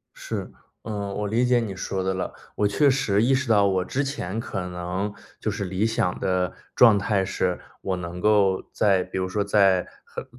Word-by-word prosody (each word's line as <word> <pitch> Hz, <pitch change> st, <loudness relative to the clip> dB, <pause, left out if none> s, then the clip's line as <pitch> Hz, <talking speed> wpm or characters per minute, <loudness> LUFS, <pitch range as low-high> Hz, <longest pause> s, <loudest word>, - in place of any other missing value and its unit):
是， -, -, -5 dB, 0.3 s
嗯， 105 Hz, -2 st, -4 dB
我 105 Hz, 0 st, -2 dB
理 115 Hz, +4 st, +1 dB
解 125 Hz, 0 st, +4 dB
你 105 Hz, -4 st, -4 dB
说 95 Hz, 0 st, -3 dB
的 95 Hz, 0 st, 0 dB
了， 95 Hz, -, -3 dB, 0.2 s
我 105 Hz, -, +2 dB
确 140 Hz, +8 st, +3 dB
实 125 Hz, -7 st, +2 dB
意 130 Hz, +3 st, +4 dB
识 130 Hz, -1 st, -1 dB
到 105 Hz, -3 st, +5 dB
我 95 Hz, -2 st, +1 dB
之 135 Hz, +8 st, -1 dB
前 115 Hz, -8 st, -4 dB
可 105 Hz, -3 st, -3 dB
能， 90 Hz, +3 st, -3 dB, 0.3 s
就 -, -, -1 dB
是 100 Hz, -, -3 dB
理 95 Hz, +2 st, -1 dB
想 115 Hz, -5 st, 0 dB
的 90 Hz, -1 st, 0 dB, 0.2 s
状 115 Hz, -4 st, +7 dB
态 100 Hz, -1 st, +1 dB
是， 95 Hz, -1 st, -1 dB, 0.2 s
我 95 Hz, -1 st, -1 dB
能 90 Hz, 0 st, -6 dB
够 100 Hz, -2 st, +3 dB
在 95 Hz, -3 st, +3 dB
比 95 Hz, -, -5 dB
如 95 Hz, 0 st, -1 dB
说 100 Hz, +3 st, 0 dB
在 100 Hz, -3 st, +3 dB, 0.2 s
很 -, -, -7 dB
100 Hz, 215 characters per minute, -24 LUFS, 95-115 Hz, 0.3 s, 状